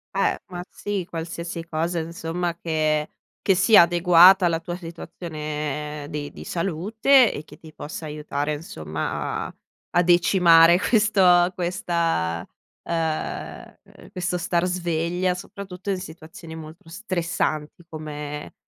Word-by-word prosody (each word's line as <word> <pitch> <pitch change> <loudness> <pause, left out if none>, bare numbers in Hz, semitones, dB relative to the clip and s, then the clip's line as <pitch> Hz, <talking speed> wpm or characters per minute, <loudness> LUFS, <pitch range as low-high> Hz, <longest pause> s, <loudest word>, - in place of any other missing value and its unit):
Eh, - - +1
ma, 175 0 -5
sì, 200 -4 -4
qualsiasi 170 0 -5
cosa, 165 +2 -2
insomma, 165 +1 -3
che 155 -2 0 0.3
che 195 - +4
sia 195 +2 +7
adeguata 175 +2 +6
alla 165 -1 +1
tua 175 +1 -5
situazione 150 -4 -5
di 145 -2 -5
di - - -10
salute 210 - +3
e 145 - -6
che - - -15
ti 160 -2 -14
possa 155 +2 -7
aiutare, 150 -1 -3
insomma, 80 - -4
a - - -13 0.4
a 175 - +5
decimare 175 -1 +6
questo 190 -5 +4
questa 170 - -1 0.4
uhm, 165 -2 -3 0.4
questo 180 0 -2
star 170 0 0
sveglia, 175 0 -1
soprattutto 190 +1 -8
in 195 - +1
situazioni 160 -1 -10
molto 160 +1 -11
stressanti 170 -4 -3
come 150 -2 -7
170 Hz, 120 wpm, -24 LUFS, 155-180 Hz, 0.4 s, sia